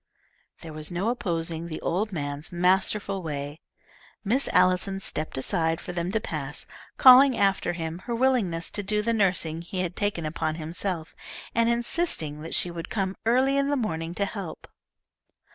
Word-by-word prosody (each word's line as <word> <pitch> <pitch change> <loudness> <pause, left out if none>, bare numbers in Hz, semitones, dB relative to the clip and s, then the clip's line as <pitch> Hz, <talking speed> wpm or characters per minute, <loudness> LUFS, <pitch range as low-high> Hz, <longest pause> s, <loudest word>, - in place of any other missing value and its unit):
There 160 -1 -8
was 155 +1 -4
no 185 +6 0
opposing 170 -7 -2
the 160 -2 -5
old 205 +5 -1
man's 145 -2 -4
masterful 190 +2 +2
way. 145 -1 -5 0.6
Miss 245 +7 +1
Allison 185 +2 +2
stepped 155 -6 -3
aside 160 +4 0
for 180 - -7
them 175 +1 -2
to 220 - +1
pass, 150 -7 -5 0.3
calling 260 0 +8
after 195 -3 +2
him 165 0 -4
her 235 - -1
willingness 230 -10 +1
to 205 - 0
do 210 +1 0
the 230 +1 +1
nursing 180 -6 +1
he 180 +2 -4
had 180 -1 -3
taken 205 -6 -1
upon 155 0 -2
himself, 165 +1 -4 0.4
and 230 0 +3
insisting 235 - 0
that 165 - -4
she 175 - +2
would 170 -1 -6
come 195 -2 -1
early 260 +4 +3
in 280 0 +1
the 285 - +1
morning 165 -7 -3
to 200 - +1
help. 195 -5 -7
180 Hz, 165 wpm, -26 LUFS, 165-210 Hz, 0.6 s, calling